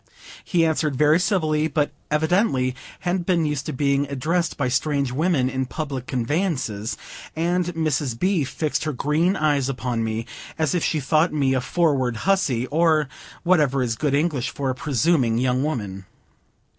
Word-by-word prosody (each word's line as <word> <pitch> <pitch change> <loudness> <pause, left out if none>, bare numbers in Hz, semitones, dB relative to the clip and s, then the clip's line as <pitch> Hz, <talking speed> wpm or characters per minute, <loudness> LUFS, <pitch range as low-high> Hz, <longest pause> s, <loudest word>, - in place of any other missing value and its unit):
He 170 -2 +2
answered 155 -3 0
very 150 +4 +4
civilly, 155 -5 +1
but 145 -1 0 0.2
evidently 150 - +1 0.3
hadn't 180 -1 -1
been 175 -4 +2
used 150 -2 -2
to - - -2
being 140 +1 +1
addressed 160 +6 -1
by 140 - 0
strange 140 +1 0
women 150 -1 +1
in 130 0 -2
public 135 -3 -5
conveyances; 125 - -1 0.4
and 175 +2 +1
Mrs. 145 -6 -1
B. 185 +1 +1
fixed 150 +3 -2
her 155 - -1
green 155 +8 +1
eyes 145 -3 +1
upon 125 -3 -2
me, 110 +1 -2 0.3
as 160 -3 +1
if 175 - 0
she 155 - +1
thought 155 +4 +2
me 140 -3 +1
a 130 - +1
forward 135 -5 +1
huzzy, 165 -12 +2
or 155 -2 +3 0.3
whatever 150 -7 +3
is 115 -2 -1
good 140 +3 0
English 145 -4 0
for 135 -2 -2
a - - -2
presuming 135 -2 +1
young 125 +1 +1
woman. 105 -10 -3
145 Hz, 160 wpm, -23 LUFS, 130-160 Hz, 0.4 s, very